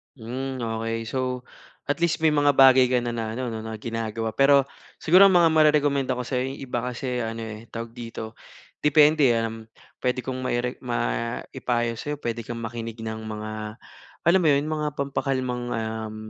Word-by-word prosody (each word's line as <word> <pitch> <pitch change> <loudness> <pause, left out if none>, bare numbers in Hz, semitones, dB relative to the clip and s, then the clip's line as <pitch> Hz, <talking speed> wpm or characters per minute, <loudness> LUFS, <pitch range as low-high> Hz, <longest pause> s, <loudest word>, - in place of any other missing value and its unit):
Hmm, 130 +2 -5
okey. 115 0 -2
So, 130 -1 -2 0.5
at 145 - 0
least 170 -2 +1
may 155 - +5
mga 145 -1 +3
bagay 130 -1 +7
ka 125 - +3
na 120 - -2
na 115 -1 -2
ano 125 -1 -3
'no 110 - -4
na 110 0 -5
ginagawa. 115 0 -3
Pero 140 0 +5 0.4
siguro 185 +5 +7
mga 175 -3 +5
marerekomenda 145 -4 +3
ko 125 - -3
sa'yo 125 +1 -1
'yong - - -10
iba 125 -2 -2
kasi 125 0 -3
ano, 115 0 -4
eh, 110 +1 -8
tawag 115 0 -6
dito, 115 -2 -7 0.4
depende, 150 -2 +5
um, 115 0 -5 0.3
puwede 125 0 0
kong 130 -1 -4
maire 125 0 -1
maipayo 120 0 -2
sa 150 +3 -3
puwede 115 -5 -4
kang 120 +1 -5
makinig 115 0 -6
ng 110 0 -4
mga, 110 0 -5 0.8
alam 180 +3 +6
mo - - +3
yun 140 +1 +2
mga 150 -1 -1
pampakalmang, 130 -3 -2
um 110 -1 -4
125 Hz, 170 wpm, -25 LUFS, 115-140 Hz, 0.8 s, bagay